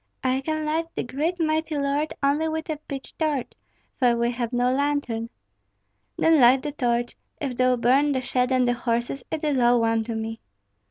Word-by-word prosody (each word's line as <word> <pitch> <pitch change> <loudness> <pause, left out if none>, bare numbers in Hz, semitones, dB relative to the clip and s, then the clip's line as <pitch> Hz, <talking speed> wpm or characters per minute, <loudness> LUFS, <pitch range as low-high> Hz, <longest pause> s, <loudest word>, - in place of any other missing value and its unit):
"I 260 +1 +1
can 310 +1 -2
light 320 +2 -1
the - - -1
great 310 +8 -2
mighty 315 -1 0
lord 285 +2 0
only 290 +3 +2
with 320 0 -3
a 305 - -3
pitch 280 -2 -8
torch, 300 -6 -1 0.5
for 245 -2 +3
we 235 +1 +1
have 240 -1 -3
no 245 +1 +1
lantern." 270 -5 -1 0.9
"Then 325 -1 +4
light 255 +2 +6
the 295 - -3
torch; 240 -3 -1 0.2
if 275 -5 -3
thou 255 0 +3
burn 265 +5 +3
the 260 - 0
shed 250 +1 0
and 255 -1 +3
the 245 - +3
horses, 240 +2 -2
it 320 -1 -4
is 290 -4 +1
all 240 0 +4
one 225 -1 +1
to 230 0 -4
me." 225 0 -4
260 Hz, 195 wpm, -24 LUFS, 240-300 Hz, 0.9 s, light